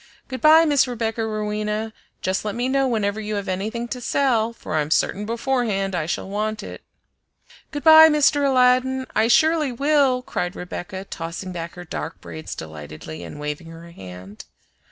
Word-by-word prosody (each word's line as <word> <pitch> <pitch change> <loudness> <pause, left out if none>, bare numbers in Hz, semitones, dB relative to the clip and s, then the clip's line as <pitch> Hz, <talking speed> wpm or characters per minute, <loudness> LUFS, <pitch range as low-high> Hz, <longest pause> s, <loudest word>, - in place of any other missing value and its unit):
Good 260 -1 -6
by 315 +2 +7
Miss 290 -4 +3
Rebecca 230 -2 -2
Rowena! 215 0 -2 0.3
Just 185 +1 -1
let 210 -1 -3
me 245 +2 -1
know 270 0 +2
whenever 215 -3 -1
you 210 0 -3
have 200 -1 -4
anything 215 +6 -3
to 250 0 -5
sell, 235 -4 +1
for 230 - -8
I'm 150 -1 0
certain 205 +5 0
beforehand 230 -5 -1
I 170 -3 -2
shall 175 - -3
want 215 +2 -3
it." - - -9 0.9
"Good 290 -2 -6
by, 315 +1 +9
Mr. 295 -1 +3
Aladdin! 260 0 +3
I 220 - +3
surely 315 +2 +3
will!" 275 -1 +2
cried 180 -6 -3
Rebecca, 180 +2 -6
tossing 175 +1 -6
back 170 -1 -6
her 180 0 -9
dark 160 +1 -6
braids 155 - -8
delightedly 80 +1 -9
and 85 - -9
waving 150 +2 -5
her 165 +1 -11
hand. 95 - -11
215 Hz, 170 wpm, -22 LUFS, 175-255 Hz, 0.9 s, by